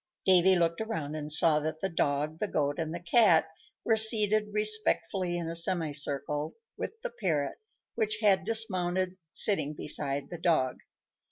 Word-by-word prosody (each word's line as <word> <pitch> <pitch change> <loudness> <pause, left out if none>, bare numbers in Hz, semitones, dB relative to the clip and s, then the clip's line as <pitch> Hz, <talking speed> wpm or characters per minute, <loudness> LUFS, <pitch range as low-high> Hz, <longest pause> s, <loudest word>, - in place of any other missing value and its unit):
Davy 185 0 +4
looked 170 +2 -1
around 160 -10 -5
and 150 -1 -4
saw 155 0 +6
that 155 +1 -5
the 195 - -2
dog, 150 -2 -2
the 210 - -2
goat, 145 -4 -2
and 160 -1 -3
the 170 - -6
cat 175 -2 +3 0.4
were 225 - +2
seated 215 -1 +3
respectfully 210 -4 0
in 170 - -4
a 165 - -4
semicircle, 150 -3 0 0.2
with 445 - -7
the - - -5
parrot, 155 -9 -3 0.3
which 215 -1 -1
had 195 -3 +2
dismounted, 185 -4 +1
sitting 155 -8 +1
beside 140 -2 -4
the 175 - -7
dog. 155 -7 0
175 Hz, 155 wpm, -28 LUFS, 155-210 Hz, 0.4 s, saw